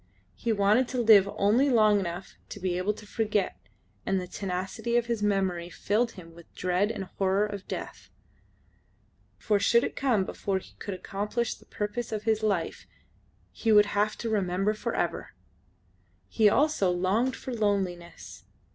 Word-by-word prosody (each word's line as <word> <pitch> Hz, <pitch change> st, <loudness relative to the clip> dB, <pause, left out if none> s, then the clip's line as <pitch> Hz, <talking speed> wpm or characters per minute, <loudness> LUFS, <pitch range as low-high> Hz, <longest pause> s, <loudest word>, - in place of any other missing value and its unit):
He 235 Hz, -, -2 dB
wanted 210 Hz, +4 st, +3 dB
to 255 Hz, -, -3 dB
live 215 Hz, -4 st, +6 dB
only 230 Hz, +8 st, +3 dB
long 215 Hz, -4 st, +4 dB
enough 175 Hz, 0 st, -5 dB, 0.2 s
to -, -, -8 dB
be 185 Hz, -2 st, -1 dB
able 185 Hz, +4 st, 0 dB
to 210 Hz, -, -12 dB
forget, 210 Hz, -2 st, -1 dB, 0.4 s
and 195 Hz, 0 st, 0 dB
the 180 Hz, -, -4 dB
tenacity 190 Hz, +6 st, -3 dB
of 240 Hz, -, +1 dB
his 235 Hz, -3 st, -2 dB
memory 190 Hz, -4 st, 0 dB
filled 225 Hz, +6 st, 0 dB
him 165 Hz, -4 st, -12 dB
with 170 Hz, 0 st, -16 dB
dread 185 Hz, +3 st, +1 dB
and 220 Hz, -3 st, -4 dB
horror 195 Hz, +2 st, 0 dB
of 200 Hz, -2 st, -7 dB
death; -, -, -7 dB, 1.3 s
for 210 Hz, -3 st, +1 dB
should 235 Hz, +3 st, +4 dB
it -, -, -3 dB
come 235 Hz, -8 st, +1 dB
before 195 Hz, 0 st, -2 dB
he 190 Hz, -, -10 dB
could 200 Hz, -, -5 dB
accomplish 210 Hz, +5 st, -2 dB
the -, -, -19 dB
purpose 215 Hz, +3 st, -4 dB
of 215 Hz, -1 st, -3 dB
his 220 Hz, -1 st, +1 dB
life 195 Hz, -7 st, -1 dB, 0.6 s
he 225 Hz, -, -1 dB
would 210 Hz, -1 st, +7 dB
have 210 Hz, +1 st, +1 dB
to 230 Hz, -, -4 dB
remember 195 Hz, 0 st, +1 dB
for 215 Hz, -, -4 dB
ever! -, -, -2 dB, 0.9 s
He 215 Hz, -2 st, +4 dB
also 285 Hz, -6 st, +2 dB
longed 190 Hz, +8 st, +1 dB
for 260 Hz, -, -6 dB
loneliness. 195 Hz, -6 st, -2 dB
205 Hz, 165 wpm, -28 LUFS, 190-220 Hz, 1.3 s, would